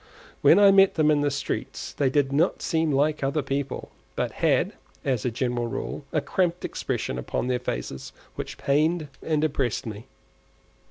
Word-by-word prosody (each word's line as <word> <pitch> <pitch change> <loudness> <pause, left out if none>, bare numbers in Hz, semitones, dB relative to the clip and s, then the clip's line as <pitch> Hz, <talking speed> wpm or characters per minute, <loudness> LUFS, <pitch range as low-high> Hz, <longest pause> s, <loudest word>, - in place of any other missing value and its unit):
When - - +7
I 200 -1 +8
met 195 0 +5
them 155 -1 +4
in 145 -1 +3
the 145 - +2
streets 140 0 -4
they 140 -2 +1
did 140 0 +1
not 160 +6 +2
seem 160 -2 +1
like 145 +2 +1
other 140 +2 0
people, 140 0 -3 0.2
but - - -1
had, - - +1 0.3
as 130 -5 0
a - - +2
general 120 0 -1
rule, 135 - -5
a 155 - +1
cramped 175 +2 0
expression 60 - -3
upon 65 - -2
their 125 -1 +1
faces 65 - -5 0.2
which - - -6
pained 155 +2 +1
and 155 -2 0
depressed 135 -5 0
me. 110 0 -7
140 Hz, 170 wpm, -25 LUFS, 130-155 Hz, 0.3 s, I